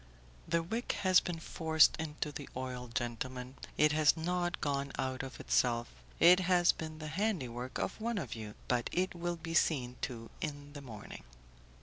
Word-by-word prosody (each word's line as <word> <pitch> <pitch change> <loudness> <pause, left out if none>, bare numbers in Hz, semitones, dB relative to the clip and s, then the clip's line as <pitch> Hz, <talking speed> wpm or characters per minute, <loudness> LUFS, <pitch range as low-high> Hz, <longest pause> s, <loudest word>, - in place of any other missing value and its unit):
"The 170 0 +1
wick 225 +8 -2
has 185 -1 +7
been 175 -3 -4
forced 160 -1 +4
into 150 -1 -3
the 145 -1 -7
oil, 125 -1 -4
gentlemen; 125 +2 -3 0.2
it 150 0 +5
has 155 +1 +4
not 175 +2 -1
gone 140 -1 -1
out 130 -1 -1
of 135 0 -8
itself; 120 -1 +1 0.3
it 180 +2 +8
has 180 -1 +4
been 155 -1 -7
the 155 - -7
handiwork 150 - -2
of - - -3
one 230 0 -1
of 145 - -3
you, 110 -2 -7
but 120 -1 +1
it 185 +1 0
will 175 0 -2
be 165 0 -6
seen 125 -7 +2
to 115 -3 -5
in 145 -3 -5
the 145 - -7
morning." 110 -6 -9
150 Hz, 175 wpm, -33 LUFS, 130-170 Hz, 0.3 s, it